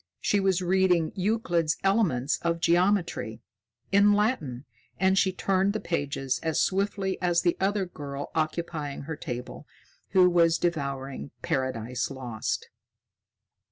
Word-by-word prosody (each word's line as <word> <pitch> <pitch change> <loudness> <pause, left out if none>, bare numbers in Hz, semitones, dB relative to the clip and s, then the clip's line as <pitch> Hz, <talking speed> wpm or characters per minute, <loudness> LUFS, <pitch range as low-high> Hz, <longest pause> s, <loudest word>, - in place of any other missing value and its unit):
She 205 - +1
was 190 -2 +1
reading 180 -3 +2
"Euclid's 180 -5 0
Elements 185 - +2
of 170 0 0
Geometry," 170 - +1 0.5
in 200 +1 +5
Latin, 170 - 0 0.3
and 190 0 +3
she 190 0 +3
turned 195 +1 +1
the 215 - -2
pages 140 -6 -2
as 160 -1 0
swiftly 195 0 0
as 175 -1 +2
the 175 -2 +2
other 195 0 +1
girl 145 -5 -7
occupying 155 -2 -2
her 160 +3 -5
table, 125 -4 -7 0.5
who 185 -1 +6
was 170 -2 +4
devouring 140 - -3
"Paradise 125 -2 -1
Lost." 125 -5 -4
170 Hz, 120 wpm, -27 LUFS, 140-190 Hz, 0.5 s, who